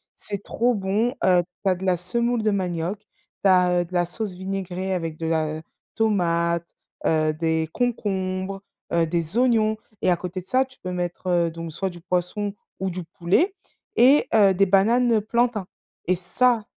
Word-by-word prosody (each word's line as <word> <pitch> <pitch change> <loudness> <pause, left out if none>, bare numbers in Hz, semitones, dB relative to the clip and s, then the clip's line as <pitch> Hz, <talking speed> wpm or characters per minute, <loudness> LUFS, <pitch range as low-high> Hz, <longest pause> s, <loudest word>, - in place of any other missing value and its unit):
C'est 200 -1 -5
trop 240 +1 +1
bon, 205 +5 0
heu, 180 -1 +5 0.2
tu - - +4
as - - +2
de 180 - -9
la 185 -1 +2
semoule 235 +6 0
de 215 - +2
manioc, 180 0 -2 0.4
tu 195 - +5
as, 180 -1 +4
heu, - - -3
de 175 - -16
la 175 -1 +2
sauce 200 +3 -4
vinaigrée 190 0 -3
avec 165 -3 -3
de 165 - -4
la 155 -1 0 0.3
tomate, 170 -5 +1 0.4
heu, 155 -1 +2
des 160 0 0
concombres, 195 -5 -2 0.3
heu, 170 -1 +3
des 170 +4 -1
oignons 225 -3 +3 0.3
et 185 - +4
à - - +4
côté 180 +1 -5
de - - -20
ça, 255 +6 +3
tu 260 0 -17
peux 185 - -5
mettre, 180 0 -4
heu, 170 -2 +2
donc 165 0 -7
soit 190 +4 -2
du 175 -1 -11
poisson 180 +4 -1 0.3
ou 190 0 -1
du 180 0 -5
poulet 180 - +1 0.4
et, 265 +5 +6
heu, 200 -3 +6
des 195 +2 +3
bananes, 230 +6 +4
heu, 220 - +3
plantain. 235 -1 0 0.4
Et 185 - +3
ça, 220 +6 +1
185 Hz, 185 wpm, -24 LUFS, 175-215 Hz, 0.4 s, et